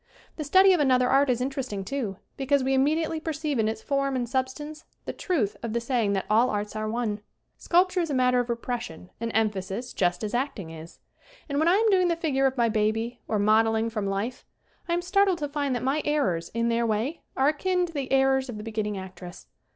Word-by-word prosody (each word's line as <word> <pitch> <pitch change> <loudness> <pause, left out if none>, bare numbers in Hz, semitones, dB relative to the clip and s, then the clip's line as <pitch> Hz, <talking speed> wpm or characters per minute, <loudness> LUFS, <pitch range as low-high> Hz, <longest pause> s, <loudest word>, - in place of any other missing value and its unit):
The 310 - -4
study 375 +6 +6
of 355 - +2
another 255 -3 +3
art 275 +2 +3
is 250 -1 +1
interesting, 255 -7 -3
too, 225 -6 -3 0.2
because 275 0 +1
we 265 +1 +1
immediately 310 +4 +1
perceive 305 -4 -2
in 215 - +2
its 220 0 -3
form 275 -1 0
and 245 -2 -1
substance 275 +5 -3 0.2
the - - -4
truth 225 - -1
of 230 -2 -4
the 235 - +1
saying 235 -4 0
that 195 - -1
all 230 +4 +4
arts 210 +1 -3
are 215 0 -2
one. 220 -2 -2 0.4
Sculpture 365 +1 +2
is 335 -2 -1
a 285 - -1
matter 250 -1 +3
of 245 - -1
repres 235 0 -2
sion 180 -4 -10
and 230 0 -2
emphasis 215 +2 -1
just 180 +1 0
as 210 - -3
acting 240 - -2
is. 165 +1 -11 0.5
And 285 -2 -1
when 315 - +2
I 350 - +5
am 440 +2 +3
doing 370 -2 +4
the 340 - +1
figure 275 -5 +1
of 265 0 -3
my 235 -1 +3
baby, 225 +2 0
or 215 - 0
modeling 220 +2 +3
from 210 -3 -2
life, 200 +6 -3 0.5
I - - +2
am 350 - -2
startled 385 0 +3
to 295 -3 -3
find 285 -2 -1
that 245 - -3
my 275 +4 +1
errors, 265 - 0
in 230 0 +1
their 235 0 +1
way, 225 +9 -1 0.2
are 270 +2 +4
akin 360 +4 0
to 335 - -10
the 275 -3 -4
errors 265 0 +3
of 230 - -5
the 210 - -7
be 225 - -6
ginning 210 -2 -2
actress. 185 -2 -9
250 Hz, 230 wpm, -26 LUFS, 215-290 Hz, 0.5 s, study